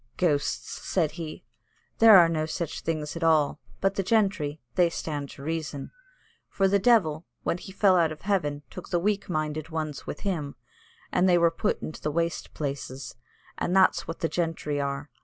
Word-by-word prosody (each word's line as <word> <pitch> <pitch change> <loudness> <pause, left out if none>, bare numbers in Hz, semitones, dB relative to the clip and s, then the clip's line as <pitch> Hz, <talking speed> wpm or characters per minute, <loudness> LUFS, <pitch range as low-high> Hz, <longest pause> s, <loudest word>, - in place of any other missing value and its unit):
"Ghosts," 150 -6 0
said 165 -5 +1
he; 160 -1 -7 0.5
"there 225 -3 +9
are 170 -2 +7
no 155 -1 -1
such 165 0 -4
things 155 -2 -3
at 165 - -4
all, 165 - +6
at - - +7
all, 145 - -7 0.2
but 195 0 +2
the 195 - 0
gentry, 190 -8 +1
they 175 -2 +4
stand 145 -4 -4
to 140 - -11
reason; 155 -2 -4 0.6
for 195 - +2
the 200 +1 +3
devil, 185 -8 +3 0.2
when 175 - -1
he 190 - -10
fell 195 -1 +4
out 165 -2 +3
of 155 - -8
heaven, 150 -8 -1
took 180 - -9
the 175 - +1
weak 200 +3 0
minded 155 -1 -2
ones 155 -3 -4
with - - -6
him, 165 -8 -2 0.6
and 185 +1 +3
they 175 - +5
were 170 -1 +4
put 170 +5 -1
into 155 - -6
the 150 - -1
waste 170 +2 -2
places. 135 -3 -5 0.4
And 180 - 0
that's 190 -1 +4
what 165 - -6
the 165 - +2
gentry 160 -4 -2
are. 140 +1 -4
165 Hz, 195 wpm, -27 LUFS, 150-185 Hz, 0.6 s, there